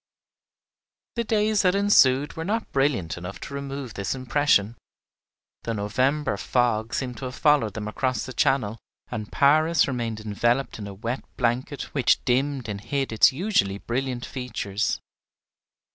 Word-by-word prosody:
The 235 Hz, -, 0 dB
days 215 Hz, -1 st, +2 dB
that 185 Hz, -1 st, +3 dB
ensued 145 Hz, -9 st, +4 dB
were 160 Hz, -, -4 dB
not 220 Hz, +6 st, -2 dB
brilliant 130 Hz, -, 0 dB
enough 90 Hz, +2 st, -7 dB
to -, -, -7 dB
remove 140 Hz, -3 st, -5 dB
this 100 Hz, +4 st, -2 dB
impression. 130 Hz, -4 st, +2 dB, 0.9 s
The 115 Hz, -, -3 dB
November 125 Hz, +5 st, 0 dB
fogs 115 Hz, -1 st, 0 dB
seemed 125 Hz, -3 st, -3 dB
to 130 Hz, -, -6 dB
have 125 Hz, +1 st, -5 dB
followed 145 Hz, -, +3 dB
them 105 Hz, -1 st, -4 dB
across 125 Hz, +1 st, -1 dB
the 130 Hz, -, -7 dB
Channel, 115 Hz, -3 st, +1 dB, 0.3 s
and 105 Hz, -1 st, -5 dB
Paris 155 Hz, +3 st, +4 dB
remained 120 Hz, -5 st, -3 dB
enveloped 120 Hz, +5 st, 0 dB
in 100 Hz, -, -6 dB
a 100 Hz, -, -7 dB
wet 115 Hz, +5 st, -4 dB
blanket 125 Hz, +4 st, -1 dB
which 135 Hz, -4 st, +2 dB
dimmed 130 Hz, 0 st, 0 dB
and 100 Hz, -1 st, -5 dB
hid 135 Hz, +4 st, -2 dB
its 110 Hz, -, +6 dB
usually 135 Hz, -, +1 dB
brilliant 125 Hz, +2 st, -3 dB
features. 110 Hz, -5 st, -2 dB
130 Hz, 145 wpm, -25 LUFS, 110-140 Hz, 0.9 s, its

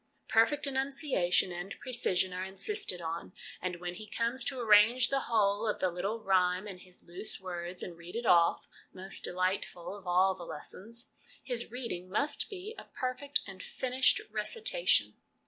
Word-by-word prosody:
Perfect 280 Hz, +7 st, +4 dB
enunciation 270 Hz, -, +1 dB
and 175 Hz, +3 st, -5 dB
precision 190 Hz, -8 st, +1 dB
are 185 Hz, +1 st, -3 dB
insisted 190 Hz, -, -2 dB
on, 165 Hz, +2 st, -4 dB, 0.3 s
and 180 Hz, -1 st, -2 dB
when 175 Hz, 0 st, -5 dB
he 215 Hz, +4 st, -9 dB
comes 235 Hz, +3 st, 0 dB
to 265 Hz, -2 st, -2 dB
arrange 230 Hz, +2 st, +6 dB
the 275 Hz, -, +2 dB
whole 210 Hz, -1 st, +3 dB
of 210 Hz, -, +1 dB
the 185 Hz, -, +1 dB
little 200 Hz, +6 st, -2 dB
rhyme 185 Hz, 0 st, +3 dB
in 190 Hz, -3 st, -7 dB
his 180 Hz, 0 st, -13 dB
loose 180 Hz, +5 st, -3 dB
words 180 Hz, -1 st, -5 dB
and 175 Hz, -, -6 dB
read 170 Hz, +3 st, -11 dB
it 235 Hz, +1 st, -2 dB
off(most 185 Hz, +2 st, +1 dB
delightful 185 Hz, 0 st, -2 dB
of 195 Hz, -3 st, -12 dB
all 185 Hz, +2 st, +4 dB
the 180 Hz, -2 st, -9 dB
lessons) 215 Hz, +9 st, -5 dB, 0.3 s
his 240 Hz, -2 st, -3 dB
reading 230 Hz, -7 st, -5 dB
must 280 Hz, -, 0 dB
be 400 Hz, +2 st, -6 dB
a -, -, -10 dB
perfect 260 Hz, +3 st, -2 dB
and 195 Hz, -2 st, -9 dB
finished 255 Hz, +4 st, +1 dB
recitation. 440 Hz, -, +1 dB
200 Hz, 160 wpm, -32 LUFS, 180-250 Hz, 0.3 s, arrange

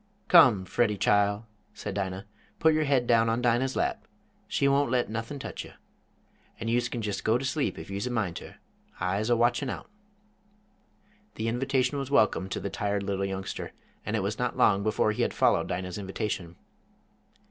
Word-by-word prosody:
"Come, 125 Hz, -, +7 dB
Freddie 105 Hz, 0 st, +1 dB
chile," 105 Hz, +1 st, +2 dB, 0.3 s
said 100 Hz, -, -5 dB
Dinah, 95 Hz, -1 st, -3 dB, 0.3 s
"put 160 Hz, -1 st, +4 dB
yer 155 Hz, 0 st, +1 dB
head 135 Hz, -3 st, +2 dB
down 115 Hz, -1 st, +4 dB
on 115 Hz, +1 st, +1 dB
Dinah's 125 Hz, +2 st, +1 dB
lap. -, -, -1 dB, 0.4 s
She 140 Hz, -, +1 dB
won't 140 Hz, -1 st, +3 dB
let 125 Hz, -2 st, 0 dB
nothin' 115 Hz, +5 st, -4 dB
tech 135 Hz, -, -6 dB
you. -, -, -13 dB, 0.9 s
An' 115 Hz, -, -3 dB
youse 120 Hz, +1 st, +1 dB
kin 115 Hz, -, -4 dB
jest 105 Hz, -2 st, -3 dB
go 110 Hz, +2 st, +3 dB
to 135 Hz, -, -4 dB
sleep 140 Hz, +1 st, -1 dB
if -, -, -8 dB
youse 100 Hz, +5 st, -3 dB
a -, -, -2 dB
mind 110 Hz, -8 st, -1 dB
ter. -, -, -10 dB, 0.4 s
I'se 100 Hz, +5 st, -1 dB
a 120 Hz, -, +4 dB
watchin' 120 Hz, +3 st, +2 dB
out." -, -, -7 dB, 1.4 s
The 110 Hz, -, -3 dB
invitation 130 Hz, +3 st, 0 dB
was 135 Hz, -1 st, -4 dB
welcome 110 Hz, -7 st, +2 dB
to -, -, -3 dB
the 100 Hz, -, -4 dB
tired 100 Hz, -1 st, -1 dB
little 100 Hz, 0 st, -1 dB
youngster, 95 Hz, 0 st, -5 dB, 0.3 s
and 105 Hz, -, -2 dB
it 105 Hz, -, 0 dB
was 105 Hz, +2 st, -3 dB
not 125 Hz, -1 st, -1 dB
long 100 Hz, -2 st, +4 dB
before 110 Hz, +1 st, +1 dB
he 105 Hz, -, -2 dB
had -, -, 0 dB
followed -, -, +3 dB
Dinah's 90 Hz, +1 st, -4 dB
invitation. 95 Hz, -3 st, -4 dB
115 Hz, 185 wpm, -28 LUFS, 100-125 Hz, 1.4 s, Come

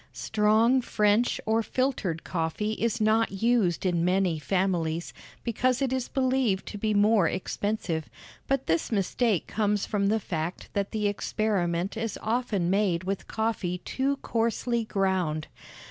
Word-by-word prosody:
Strong 220 Hz, +4 st, +3 dB
French 215 Hz, 0 st, +2 dB
or 220 Hz, +1 st, +2 dB
filtered 220 Hz, -10 st, -1 dB
coffee 170 Hz, +5 st, -2 dB
is 230 Hz, +1 st, -1 dB
not 220 Hz, +1 st, +3 dB
used 225 Hz, -8 st, +2 dB
in 175 Hz, -2 st, +1 dB
many 180 Hz, -2 st, +1 dB
families, 170 Hz, -1 st, -1 dB, 0.3 s
because 255 Hz, +2 st, +1 dB
it 270 Hz, -2 st, 0 dB
is 260 Hz, -2 st, -1 dB
believed 255 Hz, -7 st, +1 dB
to 205 Hz, -, -7 dB
be 215 Hz, +1 st, 0 dB
more 205 Hz, -2 st, +4 dB
expensive; 185 Hz, -4 st, -2 dB, 0.4 s
but 270 Hz, -1 st, 0 dB
this 165 Hz, +6 st, 0 dB
mistake 210 Hz, -1 st, +1 dB
comes 210 Hz, -2 st, 0 dB
from 200 Hz, -2 st, 0 dB
the 220 Hz, +2 st, +2 dB
fact 170 Hz, -3 st, -4 dB
that 200 Hz, -1 st, -1 dB
the 215 Hz, -2 st, 0 dB
experiment 195 Hz, -3 st, -1 dB
is 225 Hz, -2 st, -3 dB
often 220 Hz, -6 st, 0 dB
made 185 Hz, -2 st, +1 dB
with 195 Hz, +1 st, -3 dB
coffee 220 Hz, -5 st, -1 dB
too 275 Hz, +2 st, 0 dB
coarsely 230 Hz, 0 st, 0 dB
ground. 185 Hz, -7 st, 0 dB
210 Hz, 140 wpm, -27 LUFS, 185-230 Hz, 0.4 s, more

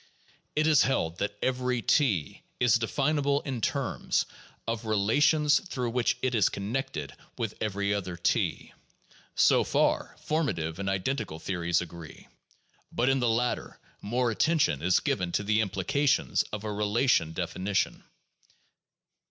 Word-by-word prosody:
It 155 Hz, -, +2 dB
is 155 Hz, -3 st, +5 dB
held 85 Hz, -10 st, 0 dB
that 100 Hz, +1 st, -2 dB
every 125 Hz, -2 st, 0 dB
T 105 Hz, -, +1 dB, 0.2 s
is 120 Hz, -2 st, +4 dB
definable 140 Hz, +3 st, +1 dB
in 130 Hz, -4 st, -4 dB
terms -, -, 0 dB, 0.4 s
of 115 Hz, 0 st, -3 dB
relations 145 Hz, +9 st, +3 dB
through 130 Hz, -, -4 dB
which 120 Hz, 0 st, +1 dB
it 130 Hz, -1 st, +1 dB
is 110 Hz, -5 st, +3 dB
connected 100 Hz, -, -4 dB, 0.2 s
with 110 Hz, -3 st, -2 dB
every 100 Hz, -1 st, 0 dB
other 95 Hz, -3 st, -3 dB
T. 85 Hz, -, -1 dB, 0.6 s
So -, -, +5 dB
far -, -, +1 dB
formative 95 Hz, -, -1 dB
and 100 Hz, 0 st, -2 dB
identical 95 Hz, -, -2 dB
theories 85 Hz, -1 st, -1 dB
agree. 85 Hz, -2 st, -10 dB, 0.6 s
But 120 Hz, +3 st, +1 dB
in 135 Hz, 0 st, +2 dB
the 120 Hz, -2 st, +2 dB
latter 120 Hz, +2 st, -1 dB, 0.2 s
more 120 Hz, +3 st, 0 dB
at 110 Hz, -, -7 dB
tention 155 Hz, -, +2 dB
is 90 Hz, +2 st, +3 dB
given 90 Hz, -1 st, -1 dB
to -, -, +1 dB
the 105 Hz, +2 st, +2 dB
implications 110 Hz, +9 st, +1 dB
of 105 Hz, 0 st, -5 dB
a 105 Hz, -1 st, -3 dB
relational 105 Hz, -4 st, +2 dB
definition. 95 Hz, +3 st, -1 dB
110 Hz, 135 wpm, -28 LUFS, 95-135 Hz, 0.6 s, is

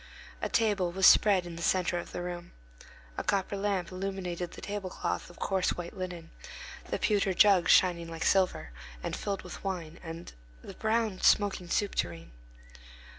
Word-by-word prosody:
A -, -, -1 dB
table 205 Hz, -6 st, +1 dB
was 190 Hz, +2 st, +2 dB
spread 195 Hz, -4 st, +6 dB
in 170 Hz, -1 st, -8 dB
the -, -, -7 dB
centre 180 Hz, 0 st, +1 dB
of -, -, -8 dB
the 175 Hz, -, -4 dB
room. 175 Hz, -1 st, -6 dB, 0.7 s
A -, -, -3 dB
copper 200 Hz, 0 st, 0 dB
lamp 195 Hz, -3 st, -1 dB
illuminated 185 Hz, -2 st, -4 dB
the -, -, -10 dB
tablecloth 200 Hz, -2 st, -4 dB
of 175 Hz, -, -15 dB
coarse 190 Hz, -2 st, 0 dB
white 175 Hz, -1 st, -6 dB
linen, 180 Hz, -3 st, -6 dB, 0.6 s
the -, -, -1 dB
pewter 200 Hz, -3 st, +1 dB
jug 195 Hz, -4 st, +5 dB
shining 175 Hz, -2 st, +4 dB
like 165 Hz, 0 st, -4 dB
silver, 185 Hz, -, +2 dB, 0.3 s
and -, -, -2 dB
filled 200 Hz, -1 st, -3 dB
with -, -, -9 dB
wine, 175 Hz, -4 st, -4 dB
and 165 Hz, 0 st, -8 dB, 0.3 s
the -, -, -9 dB
brown, 220 Hz, -3 st, 0 dB
smoking 195 Hz, -4 st, +3 dB
soup 205 Hz, +3 st, 0 dB
tureen. 85 Hz, -5 st, -3 dB
185 Hz, 165 wpm, -30 LUFS, 175-195 Hz, 0.7 s, spread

